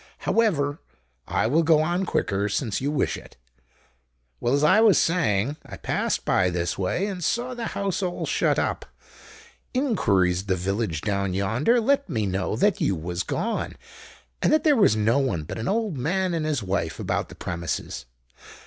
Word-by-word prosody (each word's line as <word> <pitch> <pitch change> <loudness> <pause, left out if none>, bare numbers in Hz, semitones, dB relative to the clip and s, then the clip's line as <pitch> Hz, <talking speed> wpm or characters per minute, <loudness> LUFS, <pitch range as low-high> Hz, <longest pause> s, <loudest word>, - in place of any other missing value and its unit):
However, 155 -10 +1 0.5
I - - 0
will 145 +9 +3
go 160 -1 +4
on 175 +3 -1
quicker—since 100 +2 -1
you 140 - 0
wish 150 -2 0
it. - - -12 1.0
Well, 120 +3 +1
as 145 - +1
I 210 +8 +5
was 220 -4 +6
saying, 140 - +1
I - - -10
passed - - -1
by 90 - +3
this 85 0 -1
way 95 - -1
and 190 -4 -4
saw 245 +8 -1
the 240 -2 -4
house 200 -1 -1
all 180 -2 -2
shut - - +1
up. - - -1 0.9
Inquiries 100 - +2
at 100 - -15
the 95 - +2
village 95 -2 -2
down 100 -3 -1
yonder 115 - +2
let 275 +1 +1
me 110 -8 -1
know 95 +1 -1
that 200 - +2
you 95 - +2
was 85 +2 -3
gone, 230 - -2 0.7
and - - +3
that 310 - +3
there 300 -3 +5
was 200 - +4
no 110 +5 +2
one 110 - -1
but 75 - -6
an 110 - -3
old 210 - -1
man 180 +7 0
and 160 -2 -1
his 145 -8 -1
wife 90 -4 -2
about - - -2
the - - -11
premises. 85 -7 -4
140 Hz, 175 wpm, -25 LUFS, -, 1.0 s, was